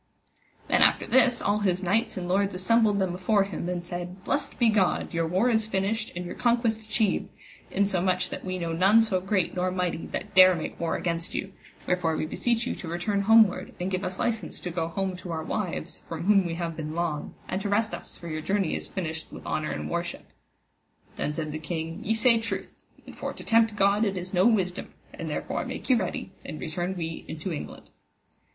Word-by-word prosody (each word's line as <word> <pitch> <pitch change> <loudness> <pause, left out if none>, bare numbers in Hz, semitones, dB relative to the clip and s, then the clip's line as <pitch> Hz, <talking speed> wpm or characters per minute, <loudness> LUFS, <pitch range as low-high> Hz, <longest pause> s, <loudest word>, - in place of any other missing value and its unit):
Then - - +3
after - - +5
this 255 -2 +4
all 205 +1 +2
his 185 -2 0
knights 220 +5 +1
and 180 -1 -3
lords 195 +1 +1
assembled 210 +2 +3
them 190 -3 0
afore 195 +3 +2
him, 185 -3 -4
and 175 -1 -3
said: 175 +2 -6
Blessed 290 - -1
be 240 - +4
God, 205 -6 +2
your 165 -1 +1
war 185 +8 +2
is 220 -1 +2
finished 215 +2 -1
and 180 +1 -4
your 175 - -5
conquest 235 -2 +1
achieved, 215 -1 0 0.4
in 200 +1 +2
so 190 -3 0
much 185 0 +1
that - - -5
we 185 -1 -3
know 170 -2 -2
none 195 +7 +5
so 190 -5 0
great 190 -1 0
nor 180 0 +1
mighty 180 -2 -2
that 205 - -5
dare 185 -1 +8
make 160 - -5
war 170 - 0
against 170 -1 -2
you: 195 0 -3 0.3
wherefore 170 -3 +1
we - - -1
beseech 235 +8 0
you - - -1
to 180 - -8
return 185 +5 -1
homeward, 220 -1 +4
and 180 +2 -2
give 185 +1 -1
us 185 0 -3
licence 225 -2 -2
to 180 - -4
go 165 -1 -1
home 190 +2 -2
to 180 -1 -7
our 160 -1 -3
wives, 195 0 -3
from 165 0 -4
whom 195 -1 +4
we 165 - -3
have 165 -1 -3
been 155 0 -5
long, 165 -3 -2
and 185 - -2
to 205 - -2
rest 215 +2 +1
us, - - -7
for 170 - -9
your 155 -1 -3
journey 195 0 0
is - - -3
finished 160 -4 -4
with - - -10
honour 155 0 -1
and - - -3
worship. 170 0 -4 0.8
Then 150 - -1
said 155 0 -3
the 155 - -4
king, 165 +1 -4
Ye 225 +2 +1
say 230 0 +5
truth, 225 - -5 0.2
and - - -11
for - - -4
to - - -10
tempt 225 -1 +3
God 200 +1 +3
it 195 -3 0
is 180 +1 -5
no 185 +3 +5
wisdom, 190 -6 0 0.2
and - - -5
therefore - - -2
make - - -3
you 250 - +6
ready 190 -1 -3
and 155 - -7
return 175 +6 -3
we 165 -1 -4
into 160 +3 -4
England. 150 - -8
185 Hz, 220 wpm, -27 LUFS, 170-210 Hz, 0.8 s, dare